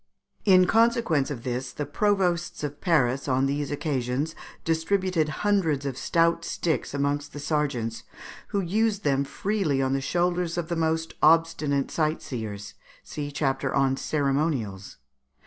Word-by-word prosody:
In 185 -2 +6
consequence 225 - +2
of 125 -5 -5
this 125 0 -3
the 145 - -4
Provosts 175 0 0
of 145 -1 -5
Paris 140 -7 +2
on 130 0 +2
these 140 +1 -1
occasions 145 0 -2 0.3
distributed 165 0 +1 0.2
hundreds 165 -9 +2
of 135 -3 -2
stout 170 +4 +1
sticks 160 -4 -2
amongst 145 +1 -1
the 145 - -6
sergeants, 135 -7 -1 0.5
who 200 -2 -1
used 205 +3 0
them 140 -1 +2
freely 185 -2 -1
on 135 0 +1
the 135 - 0
shoulders 175 +2 0
of 170 -1 -2
the 170 - -1
most 160 0 0
obstinate 155 -3 +3
sight 155 0 0
seers 105 -4 -6 0.3
(see 145 -1 -5
chapter 140 -2 -1
on 135 -1 +3
Ceremonials). 135 -9 -1
150 Hz, 140 wpm, -26 LUFS, 135-170 Hz, 0.5 s, In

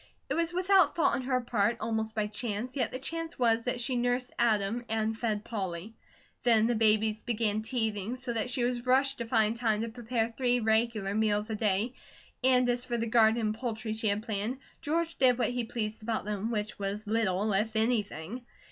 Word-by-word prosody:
It - - +1
was 335 0 0
without 365 -2 +3
thought 335 - +3
on - - 0
her 255 0 0
part, 230 -1 +1
almost 220 -1 -2
by 215 -1 +1
chance, 215 +3 -4
yet 250 -4 0
the - - -4
chance 330 +5 -5
was 230 -2 +2
that 250 0 0
she 245 +2 -1
nursed 245 +1 0
Adam 225 0 +2
and 220 0 0
fed 220 -2 -2
Polly. 195 -2 -4 0.5
Then 225 -3 +4
the 240 - +2
babies 215 -1 +2
began 220 -3 0
teething, 220 -2 -2
so 255 -1 -3
that 230 +2 -1
she 250 -1 0
was 245 0 -1
rushed 270 +1 +3
to 235 - -2
find 225 -1 +3
time 220 -3 +1
to 230 - -2
prepare 230 0 -2
three 245 -1 +2
regular 220 -2 +1
meals 210 0 +1
a - - -1
day, 210 +3 +1 0.5
and 255 -1 +4
as 245 0 +1
for 240 -1 -2
the 230 - -1
garden 225 0 +4
and 215 -1 0
poultry 220 -1 -4
she 220 0 -2
had 205 +1 +1
planned, 220 +3 -2 0.2
George 330 +2 -1
did 255 -2 +5
what 250 - +1
he 245 -1 -2
pleased 220 -2 -4
about 220 -1 -2
them, 210 +1 -2
which 215 -2 -3
was 200 +2 -3
little, 210 -1 +1
if 215 +3 0
anything. 220 -1 0
225 Hz, 200 wpm, -30 LUFS, 215-245 Hz, 0.5 s, did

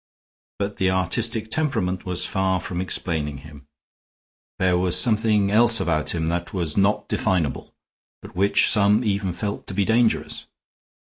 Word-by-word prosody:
But 100 0 -4
the 95 - +1
artistic 110 +5 0
temperament 95 -13 -2
was 90 0 -1
far 95 -1 0
from 90 0 -5
explaining 80 -6 -2
him; 75 -2 -14 0.9
there 95 -1 +2
was 90 0 +4
something 105 -2 +3
else 115 +1 +4
about 75 -1 -1
him 80 -1 -2
that 85 +2 -4
was 85 -5 -2
not 100 +1 +1
definable, 85 -7 -1 0.5
but - - -14
which 100 +2 +3
some 105 +2 +3
even 100 -3 -1
felt 100 +4 -5
to 95 - -7
be 100 0 +1
dangerous. 115 +1 0
95 Hz, 145 wpm, -22 LUFS, 90-105 Hz, 0.9 s, was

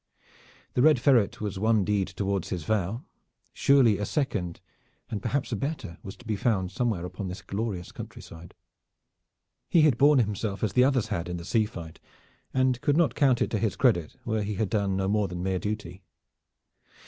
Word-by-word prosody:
The 125 - +2
Red 155 +2 +6
Ferret 125 -8 +3
was 100 -3 -3
one 110 -1 +2
deed 100 -2 +1
toward 100 -2 -2
his 90 -4 -4
vow. 110 - -1 0.5
Surely 130 -7 +4
a 105 - -1
second, 105 - -2 0.5
and 105 - -3
perhaps 135 +3 -1
a - - 0
better, 140 - -4
was 95 - -8
to 125 - -18
be 110 -2 -1
found 95 -4 0
somewhere 105 -4 -1
upon 95 +2 -6
this 90 +1 -7
glorious 100 -4 -4
countryside. 85 +1 -10 1.1
He 170 - +5
had 150 -6 +4
borne 145 +1 +6
himself 105 -3 -1
as 105 -3 0
the 125 - +5
others 130 -5 +1
had 85 +1 -2
in 90 - -3
the 85 - -8
sea 110 +2 +2
fight, 85 -6 -9 0.5
and 130 -2 +1
could 145 0 +2
not 170 -2 +3
count 130 -4 +3
it - - -4
to 110 - 0
his 110 -3 0
credit 85 - +2
where 110 -1 -1
he 105 0 -3
had 100 -1 -1
done 100 -3 0
no 95 0 0
more 105 0 +1
than 90 -1 -5
mere 95 -1 0
duty. 105 -3 -5
105 Hz, 190 wpm, -27 LUFS, 95-125 Hz, 1.1 s, Red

